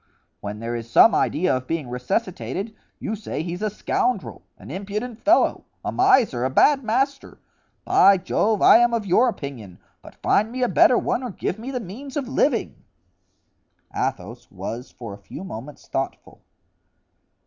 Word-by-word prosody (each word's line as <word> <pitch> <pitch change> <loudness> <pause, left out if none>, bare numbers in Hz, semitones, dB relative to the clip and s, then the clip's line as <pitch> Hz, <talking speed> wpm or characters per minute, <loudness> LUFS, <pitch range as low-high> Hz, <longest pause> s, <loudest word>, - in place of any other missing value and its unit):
when 105 +1 -6
there 115 +2 -4
is 115 -1 -6
some 225 - +6
idea 180 -2 +1
of 130 0 -5
being 160 -5 -2
resuscitated, 180 - -3 0.2
you 220 - -4
say 205 -6 -5
he's 175 +2 -5
a 215 - 0
scoundrel, 210 +1 -2 0.2
an - - -11
impudent 210 +5 -5
fellow, 320 +4 +3 0.2
a - - -1
miser, 260 - +3
a 130 - +1
bad 275 - +4
master! 265 +4 -1 0.5
By 195 0 +6
Jove! 205 +3 0
I - - +9
am 240 0 +3
of 220 -3 -2
your 225 +7 +4
opinion, 120 - -7 0.2
but - - -14
find 215 +3 +1
me 255 +1 -2
a - - +3
better 245 +1 +5
one - - -1
or 250 - -4
give 195 0 -4
me 240 +4 -6
the 260 -2 -3
means 250 - -8
of 275 -3 -2
living." 260 -1 0 1.1
Athos - - -4
was 125 +3 -6
for 115 -5 -9
a 100 - -11
few 145 - -9
moments 140 - -9
thoughtful. 135 0 -5
200 Hz, 165 wpm, -23 LUFS, -, 1.1 s, I